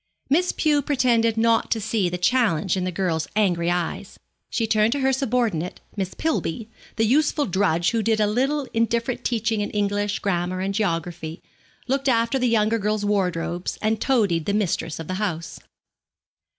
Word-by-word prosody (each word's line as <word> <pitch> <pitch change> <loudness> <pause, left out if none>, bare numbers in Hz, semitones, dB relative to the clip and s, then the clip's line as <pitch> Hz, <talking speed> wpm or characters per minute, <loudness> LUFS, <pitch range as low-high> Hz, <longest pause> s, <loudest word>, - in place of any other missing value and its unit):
Miss 355 +5 +3
Pew 300 -2 +2
pretended 240 -5 +2
not 230 0 +2
to 225 - +1
see 215 -3 0
the 180 - -3
challenge 195 -4 +2
in 185 -1 -1
the 185 - -2
girl's 170 -3 -1
angry 175 -5 +2
eyes. 175 -1 -3 0.3
She 230 - 0
turned 215 +1 +2
to 285 - -2
her 265 0 +2
subordinate, 235 - -1 0.2
Miss 190 -3 -3
Pillby, 225 - -2 0.3
the 225 - +2
useful 290 +4 +2
drudge 175 -3 +1
who 230 -1 0
did 220 0 +1
a 210 - +4
little 265 +6 0
indifferent 230 +1 0
teaching 225 -2 0
in 205 - -2
English 205 0 -1
grammar 180 -2 -1
and 195 +1 -2
geography, 170 -5 -2 0.5
looked 270 +1 0
after 230 +2 +2
the 250 - +2
younger 225 0 +2
girls' 210 0 -1
wardrobes, 180 -3 -1
and 220 0 0
toadied 205 - +2
the 200 - 0
mistress 170 -6 -1
of 160 - -6
the 185 - -3
house. 170 -5 -3
210 Hz, 170 wpm, -23 LUFS, 180-235 Hz, 0.5 s, a